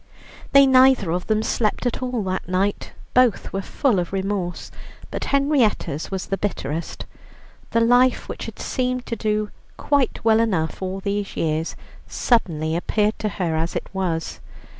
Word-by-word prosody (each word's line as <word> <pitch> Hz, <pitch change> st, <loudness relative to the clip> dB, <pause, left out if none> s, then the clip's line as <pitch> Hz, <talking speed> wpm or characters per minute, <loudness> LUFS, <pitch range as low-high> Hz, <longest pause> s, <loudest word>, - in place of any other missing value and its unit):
They 275 Hz, 0 st, +8 dB
neither 260 Hz, -8 st, +5 dB
of 180 Hz, +1 st, -2 dB
them 215 Hz, 0 st, +1 dB
slept 220 Hz, +1 st, 0 dB
at 245 Hz, -, -1 dB
all 250 Hz, -4 st, -2 dB
that 185 Hz, -1 st, -3 dB
night. 195 Hz, +2 st, -1 dB, 0.2 s
Both 250 Hz, -5 st, +3 dB
were 195 Hz, -, -1 dB
full 230 Hz, 0 st, +1 dB
of 175 Hz, -, -3 dB
remorse, 190 Hz, -2 st, -3 dB, 0.4 s
but -, -, -3 dB
Henrietta's 275 Hz, -, +1 dB
was 190 Hz, -1 st, -3 dB
the 195 Hz, -, -3 dB
bitterest. 160 Hz, -5 st, -3 dB, 0.6 s
The 230 Hz, -, +2 dB
life 245 Hz, +2 st, +4 dB
which -, -, -6 dB
had -, -, -8 dB
seemed 255 Hz, -1 st, -2 dB
to 230 Hz, -, -3 dB
do 215 Hz, -1 st, -1 dB, 0.3 s
quite 280 Hz, -6 st, 0 dB
well 220 Hz, 0 st, +5 dB
enough 185 Hz, -9 st, 0 dB
all 190 Hz, +1 st, -3 dB
these 200 Hz, 0 st, -3 dB
years, 160 Hz, 0 st, -1 dB, 0.3 s
suddenly 160 Hz, -9 st, +1 dB
appeared 210 Hz, +5 st, 0 dB
to 215 Hz, -, -1 dB
her 175 Hz, -5 st, -2 dB
as 165 Hz, +2 st, -1 dB
it -, -, -3 dB
was. 175 Hz, -4 st, -2 dB
205 Hz, 160 wpm, -22 LUFS, 180-245 Hz, 0.6 s, They